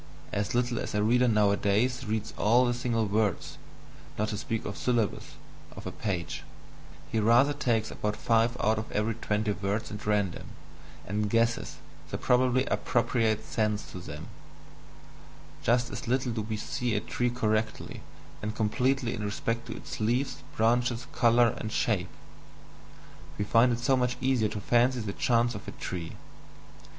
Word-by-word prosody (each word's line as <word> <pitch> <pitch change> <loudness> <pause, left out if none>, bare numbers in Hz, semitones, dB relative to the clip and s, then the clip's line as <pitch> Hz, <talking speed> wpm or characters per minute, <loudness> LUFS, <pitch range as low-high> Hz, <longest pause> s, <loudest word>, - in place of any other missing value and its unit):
As 100 +3 -1
little 120 -1 +1
as - - -4
a 105 - +2
reader 125 +3 +4
nowadays 105 +3 +2
reads 110 0 -2
all 120 +5 +4
the 120 - +1
single 120 -2 0
words 105 -2 -1 0.6
(not 105 +1 0
to 105 - -3
speak 115 -2 -3
of 100 - -4
syllables) 120 -5 -1 0.4
of - - -9
a - - -3
page 95 -5 -3 0.7
he 110 - +1
rather 120 +7 +5
takes 120 -6 0
about 105 0 -2
five 115 +1 +2
out 110 +1 +2
of 110 - -7
every 105 +2 0
twenty 105 -1 -1
words 100 +3 -2
at 105 0 -7
random, 100 -4 0 0.6
and 105 +1 -1
"guesses" 115 +1 +1 0.3
the - - -3
probably 125 +1 +3
appropriate 115 -2 +1
sense 105 -1 -1
to 90 - -7
them 75 -3 -8 1.3
just 120 +1 +2
as - - -6
little 125 0 +1
do 110 -1 -2
we 110 0 -3
see 120 0 -2
a - - +2
tree 120 +3 -1
correctly 110 -2 -1 0.4
and 105 +1 -3
completely 125 +3 +1
in 105 - -4
respect 115 +3 -2
to - - -5
its - - -7
leaves, 120 +5 0 0.2
branches, 120 +2 +2
colour, 120 0 +5
and 110 - -4
shape; - - 0 1.3
we 105 - -1
find 115 +4 +5
it 115 - +1
so 125 +3 +2
much 125 -1 0
easier 125 -4 +2
to 105 - -4
fancy 120 +4 +3
the 105 -3 -3
chance 120 +1 +2
of 100 - -8
a - - -4
tree. 85 -2 -5
115 Hz, 160 wpm, -29 LUFS, 105-120 Hz, 1.3 s, rather